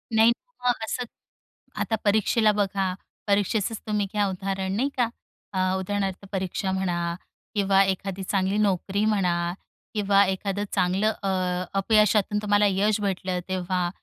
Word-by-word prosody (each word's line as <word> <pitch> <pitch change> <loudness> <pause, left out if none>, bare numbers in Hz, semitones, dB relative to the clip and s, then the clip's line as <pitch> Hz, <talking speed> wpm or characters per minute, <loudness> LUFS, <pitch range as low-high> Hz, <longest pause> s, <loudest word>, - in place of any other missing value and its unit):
नाही 225 +1 +6 0.3
हां, 250 0 +3
असं 245 +3 -2 0.8
आता 225 - 0
परीक्षेला 215 +1 +3
बघा, 195 -2 0 0.3
परीक्षेचंच 205 +2 +1
तुम्ही 210 -1 +1
घ्या 205 -1 +2
उदाहरण 190 0 -2
नाही 260 +6 +1
का, 245 -2 +3 0.5
अ, 190 - -1 0.2
उदाहरणार्थ 195 0 -2
परीक्षा 190 0 -2
म्हणा 190 -2 -1 0.6
किंवा 195 -1 +4
एखादी 195 0 -2
चांगली 195 +1 0
नोकरी 200 0 +1
म्हणा 175 -5 +1 0.4
किंवा 200 -1 +4
एखादं 195 +1 -2
चांगलं 195 +5 +2
अ, 195 - 0 0.5
अपयशातून 210 0 +3
तुम्हाला 205 0 +3
यश 205 +2 +1
भेटलं 185 -2 -1
तेव्हा, 180 -1 -1
195 Hz, 130 wpm, -25 LUFS, 190-210 Hz, 0.8 s, नाही